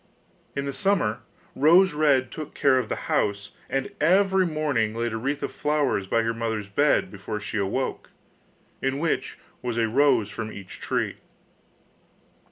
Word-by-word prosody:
In 140 - -2
the 140 - -3
summer 190 - +1 0.4
Rose 175 +6 +5
red 140 -4 +2
took 155 -2 -7
care 130 -2 +4
of 120 - -4
the - - -1
house, 100 0 0 0.2
and 135 0 -2
every 190 +3 +4
morning 145 -9 0
laid 115 0 -2
a - - -1
wreath 140 +5 -2
of - - -2
flowers 145 -10 0
by 115 +3 +2
her 115 0 0
mother's 110 -3 -3
bed 145 +10 +2
before 105 +2 -5
she 105 0 -3
awoke, 100 +7 -2 0.7
in 135 +1 0
which 165 +2 -1 0.2
was 120 -2 -3
a 115 -1 +2
rose 115 -4 +3
from 110 -1 -5
each 100 -2 -10
tree. - - -1
130 Hz, 160 wpm, -25 LUFS, 110-150 Hz, 0.7 s, Rose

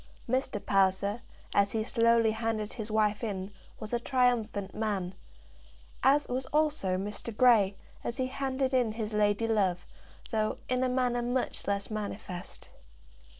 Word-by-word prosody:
Mr. 260 -2 0
Palliser, 195 +3 +2 0.3
as 200 0 +3
he 220 -1 0
slowly 230 -1 +3
handed 220 -1 -2
his 220 -3 -5
wife 215 0 +1
in, 195 -3 -3 0.3
was 215 +2 -6
a 240 - +2
triumphant 235 -6 +1
man; 200 -4 -2 0.9
as 285 +2 +4
was 255 +1 -2
also 295 -11 +1
Mr. 205 +4 -4
Grey, 220 -6 +5 0.3
as 235 - -3
he 260 - +1
handed 265 0 -1
in 245 -4 +2
his 220 -1 -4
lady 210 +1 +2
love, 190 -5 +1 0.5
though, 215 -1 0
in 255 0 +1
a 255 - +2
manner, 250 -1 +1
much 245 +1 -2
less 200 +1 -1
manifest. 200 -4 -6
220 Hz, 145 wpm, -30 LUFS, 205-250 Hz, 0.9 s, Grey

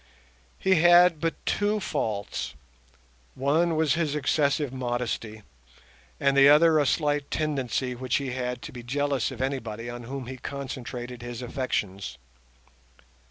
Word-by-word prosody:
He 190 -4 +3
had 175 -1 +6
but 165 -1 0
two 210 +1 +1
faults—one 65 - -3
was 155 -2 +2
his 155 -3 0
excessive 145 -1 +1
modesty, 120 -4 -3 0.8
and 140 0 +2
the 140 0 +8
other 155 +1 +6
a 145 - +2
slight 145 0 0
tendency 135 -4 -1
which 125 +1 -2
he 140 -2 -1
had 125 -1 -3
to - - -7
be 125 - -8
jealous 140 +1 0
of 130 - -4
anybody 120 -4 -3
on 120 0 -8
whom 135 +1 -5
he 130 +2 -7
concentrated 125 -2 -6
his 120 0 -6
affections. 110 -7 -3
130 Hz, 130 wpm, -27 LUFS, 120-145 Hz, 0.8 s, the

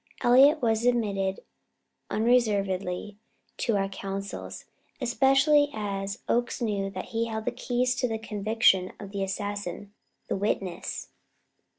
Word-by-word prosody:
Elliott 270 +4 +6
was 225 -1 +2
admitted 200 -6 +1 0.7
unreservedly 205 -4 +1 0.4
to 225 -3 +1
our 195 0 0
councils, 195 0 -6 0.3
especially 270 +3 +4
as 200 0 -4
Oakes 240 +1 0
knew 205 -4 -1
that 185 -1 -7
he 230 0 0
held 220 -1 -4
the - - 0
keys 250 +1 0
to 250 - +1
the 225 -1 -2
conviction 215 -3 +2
of 200 -1 -8
the 200 -1 -3
assassin 205 0 -4 0.3
the - - -1
witness. 195 -3 -3
210 Hz, 120 wpm, -27 LUFS, 195-240 Hz, 0.7 s, Elliott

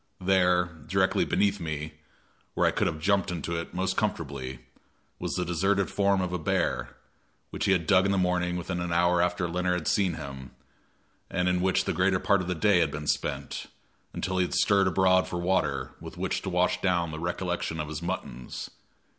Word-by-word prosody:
There, 90 -1 +3 0.2
directly - - +2
beneath 100 0 +1
me, 75 -1 -4 0.6
where - - +2
I - - +4
could - - +1
have 80 -2 -3
jumped 100 +4 +2
into 85 -1 -3
it 85 0 -4
most 95 +1 0
comfortably, 70 -10 -3 0.6
was - - -3
the 90 0 -1
deserted 95 +3 +1
form 100 -1 +2
of 90 -1 -2
the 90 - -2
bear, 80 - -1 0.6
which - - -2
he - - +3
had 90 -4 +2
dug 95 +2 +4
in - - +1
the 100 - +2
morning 90 -1 +1
within 90 +1 -3
an 85 0 -3
hour 85 +1 +3
after 90 0 0
Leonard 90 +1 0
had - - -6
seen 95 -5 +2
him, 70 -4 -8 0.7
and 90 -1 0
in 90 0 +2
which 95 0 +2
the - - 0
greater 95 +1 +2
part 100 +1 +2
of 90 - -5
the 90 - -1
day 90 +3 +4
had 80 -3 +2
been 75 +1 -6
spent, - - -2 0.4
until 95 0 -2
he - - +4
had - - -4
stirred 100 -2 +4
abroad 95 +1 +3
for 85 - -4
water, 85 -5 0
with - - -10
which - - -1
to - - -4
wash 90 0 +1
down 85 -3 +1
the 80 - -6
recollection 90 -1 -2
of 75 - -2
his 75 +1 -5
muttons. 85 -9 -5
90 Hz, 200 wpm, -28 LUFS, 85-95 Hz, 0.7 s, I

